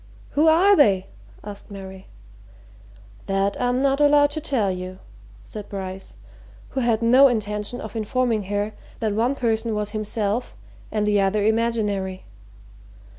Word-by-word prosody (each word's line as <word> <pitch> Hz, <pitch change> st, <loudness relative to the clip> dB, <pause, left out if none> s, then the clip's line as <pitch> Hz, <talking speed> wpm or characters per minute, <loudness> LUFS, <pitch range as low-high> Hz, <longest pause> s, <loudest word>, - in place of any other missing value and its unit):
"Who 300 Hz, +3 st, +3 dB
are 365 Hz, +6 st, +6 dB
they?" 200 Hz, -, +4 dB, 0.4 s
asked 205 Hz, -1 st, -8 dB
Mary. 190 Hz, -1 st, -10 dB, 1.2 s
"That 195 Hz, +1 st, 0 dB
I'm 250 Hz, +2 st, +1 dB
not 275 Hz, +1 st, +2 dB
allowed 290 Hz, 0 st, +5 dB
to 310 Hz, -, -4 dB
tell 245 Hz, -10 st, 0 dB
you," 185 Hz, 0 st, -6 dB, 0.5 s
said 210 Hz, -1 st, -8 dB
Bryce, 190 Hz, -1 st, -6 dB, 0.5 s
who 270 Hz, -, -3 dB
had 235 Hz, -2 st, +1 dB
no 255 Hz, +4 st, +7 dB
intention 210 Hz, 0 st, -2 dB
of 220 Hz, -, -8 dB
informing 225 Hz, -1 st, 0 dB
her 205 Hz, +2 st, -2 dB, 0.3 s
that 215 Hz, -2 st, -1 dB
one 235 Hz, +6 st, +1 dB
person 225 Hz, -3 st, -1 dB
was 210 Hz, 0 st, -3 dB
himself 215 Hz, -, -2 dB, 0.4 s
and 210 Hz, -1 st, 0 dB
the 205 Hz, -1 st, +3 dB
other 200 Hz, +1 st, +1 dB
imaginary. 210 Hz, -4 st, 0 dB
215 Hz, 135 wpm, -23 LUFS, 200-245 Hz, 1.2 s, no